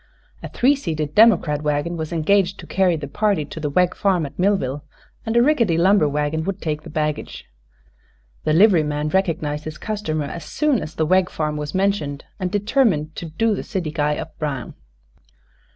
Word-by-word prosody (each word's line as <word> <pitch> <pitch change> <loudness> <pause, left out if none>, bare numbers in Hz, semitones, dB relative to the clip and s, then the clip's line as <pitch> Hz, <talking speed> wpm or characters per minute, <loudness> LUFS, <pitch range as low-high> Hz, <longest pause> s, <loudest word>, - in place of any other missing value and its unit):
A - - -7
three 270 +4 +3
seated 155 - -3
democrat 170 -9 +4
wagon 150 +3 -1
was 160 -2 -5
engaged 190 +3 +1
to - - -9
carry 185 -3 +2
the 150 -2 -5
party 200 -1 0
to 155 - -9
the 150 -1 -2
Wegg 180 +4 +2
farm 185 -6 +1
at 140 - -10
Millville, 150 -8 0 0.4
and 225 +1 +1
a 235 - +6
rickety 235 - +2
lumber 185 -2 +4
wagon 150 +2 -1
would 195 0 -3
take 155 -3 -3
the 165 - -11
baggage. 150 -1 -3 1.0
The - - +1
liveryman 155 -6 +3
recognized 155 -4 -1
his 155 0 -6
customer 160 -9 -3
as 170 +4 -7
soon 300 -6 0
as 155 - -7
the 160 - 0
Wegg 185 +2 +3
farm 150 -1 -2
was 150 +1 -5
mentioned, 190 -8 -1
and 185 -1 -1
determined 205 - +1
to 170 - -5
"do 215 +8 0
the - - -3
city 185 -8 -4
guy 150 -1 0
up - - -7
brown." 140 -5 -4
165 Hz, 185 wpm, -21 LUFS, 150-195 Hz, 1.0 s, a